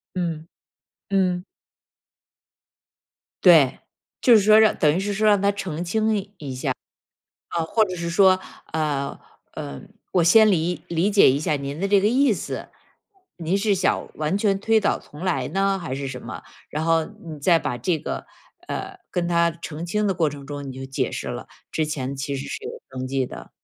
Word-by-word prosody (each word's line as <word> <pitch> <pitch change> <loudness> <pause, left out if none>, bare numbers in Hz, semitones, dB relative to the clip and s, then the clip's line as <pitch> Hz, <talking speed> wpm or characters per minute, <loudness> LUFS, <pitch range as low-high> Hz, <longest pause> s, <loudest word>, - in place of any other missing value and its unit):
嗯， 165 -3 -3 0.6
嗯。 185 -2 +1 2.0
对， 155 -8 +6 0.4
就 245 - +6
是 215 - +6
说 215 +2 +7
让 220 -1 +5
等 150 -1 +3
于 - - +1
是 205 +1 -2
说 215 +2 +2
让 205 -2 +5
他 200 0 +3
澄 180 -5 -4
清 220 +4 +1
一 195 -8 -6
下。 - - -7 1.0
嗯， 165 - +1
或 220 +6 +3
者 185 -3 -5
是 170 0 -3
说， 185 +1 +5 0.3
呃， 150 -3 -1 0.4
呃， 70 -1 -6 0.3
我 180 -3 +3
先 215 +5 +7
理 175 -1 0
理 170 +4 +1
解 200 -8 +6
一 135 - +1
下 155 0 0
您 140 +1 -5
的 195 - 0
这 200 0 +4
个 205 - +3
意 260 +2 +4
思， 200 - -5 0.7
您 170 +2 0
是 205 0 +2
想 190 - 0
完 155 +5 -1
全 200 -1 +1
推 220 +2 +3
倒 - - +1
重 150 - -14
来 185 -2 0
呢 195 0 +1
还 135 -8 -4
是 135 0 -4
什 130 -1 -6
么？ - - -8 0.3
然 155 +1 -2
后 165 -1 +3
你 170 -7 -10
再 165 +4 +4
把 145 -5 -3
这 160 +7 0
个， 155 - -5 0.4
呃， 390 0 -5
跟 175 -2 -1
他 170 -1 +3
澄 160 -1 -7
清 210 +4 0
的 195 - +2
过 165 -3 +2
程 140 -1 -10
中 145 0 -6
你 135 - -6
就 130 +1 -7
解 135 - -2
释 - - -4
了， - - -5 0.2
之 160 - 0
前 140 -3 -3
其 140 +1 -3
实 135 - -6
是 435 - -6
有 450 - -4 0.2
登 130 0 -5
记 135 0 0
的。 - - -10
170 Hz, 205 characters per minute, -23 LUFS, 150-200 Hz, 2.0 s, 说